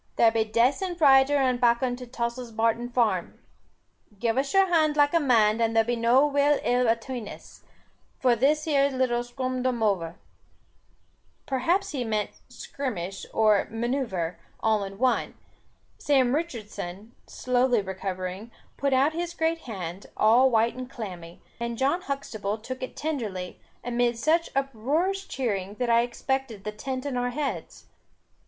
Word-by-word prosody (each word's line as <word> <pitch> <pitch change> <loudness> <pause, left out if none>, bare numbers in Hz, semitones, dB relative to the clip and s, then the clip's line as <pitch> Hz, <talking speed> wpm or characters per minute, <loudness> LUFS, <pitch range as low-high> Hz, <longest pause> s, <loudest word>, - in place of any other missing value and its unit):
There 230 -1 +5
be 225 -1 +1
dacent 260 - +1
zider 275 -2 +5
and 255 -3 +1
bakkon 245 +1 +2
to 250 -1 -9
Tossil's 235 0 -4
Barton 230 +2 0
Farm. 220 -8 0 0.8
Give 230 +2 0
us 275 +1 0
your 390 0 +5
hond 315 -4 +2
like 290 +1 +4
a 335 - +5
man, 225 -7 +3
there 225 -1 +2
be 240 +2 -1
no 235 +4 +4
ill 295 - +1 0.3
will 245 0 +1
atween 230 0 -2
us, - - -12 0.6
for 250 -2 +3
this 290 +6 +2
here 280 -3 +2
little 255 -3 0
skumdoover." 240 -8 -1 1.3
Perhaps 345 +10 0
he 270 -5 -2
meant 215 -2 -1 0.2
skirmish 195 -9 -5
and 215 -2 +3
manoeuvre, 230 -9 -2 0.2
all 220 -2 +1
in 195 0 -7
one. 255 +2 +1 0.6
Sam 265 -4 +2
Richardson, 220 - -5 0.2
slowly 250 -3 +1
recovering, 190 +2 -5 0.3
put 280 -1 0
out 275 +4 +3
his 345 +1 -4
great 325 0 0
hand, 185 -2 -6
all 240 +5 +5
white 230 -1 +2
and 255 0 -7
clammy, 180 -9 -8 0.2
and 235 0 -3
John 280 +8 +1
Huxtable 220 - -4
took 255 +4 -7
it 255 - -6
tenderly, 215 - -4 0.2
amid 240 -1 0
such 320 +7 +1
uproarious 285 - -1
cheering, 205 -6 -3
that 245 +1 -1
I 230 0 +5
expected 245 -2 -3
the 210 - -3
tent 255 +5 -5
on 275 -3 -2
our 245 0 0
heads. 280 +3 -4
245 Hz, 145 wpm, -26 LUFS, 220-275 Hz, 1.3 s, There